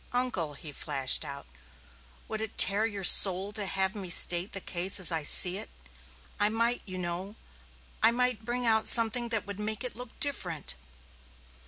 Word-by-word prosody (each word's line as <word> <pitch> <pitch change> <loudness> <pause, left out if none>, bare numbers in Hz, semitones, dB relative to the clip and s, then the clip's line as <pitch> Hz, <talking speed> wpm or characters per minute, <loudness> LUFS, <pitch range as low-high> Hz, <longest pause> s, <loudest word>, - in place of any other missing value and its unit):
Uncle," 220 - -3
he 150 +2 -6
flashed 135 -1 -2
out, 140 -2 -10 0.8
"would 220 0 -6
it 220 - -7
tear 205 +3 +7
your 200 -3 -8
soul 190 +2 +3
to 205 -1 -3
have 190 0 -2
me 195 -4 -8
state 175 +2 0
the 195 - -4
case 185 +1 -4
as 185 -1 -4
I 165 -1 -1
see 180 +5 +2
it? - - -9 0.7
I 205 0 +3
might, 230 +2 -2
you 185 -1 -8
know 180 +3 -6 0.7
I 225 - +4
might 245 -2 -2
bring 245 +2 -4
out 220 -1 +1
something 235 +1 +8
that 225 -3 -3
would 200 0 -9
make 215 +1 -4
it 250 - -3
look 245 0 -12
different." 180 - -2
205 Hz, 175 wpm, -27 LUFS, 180-225 Hz, 0.8 s, something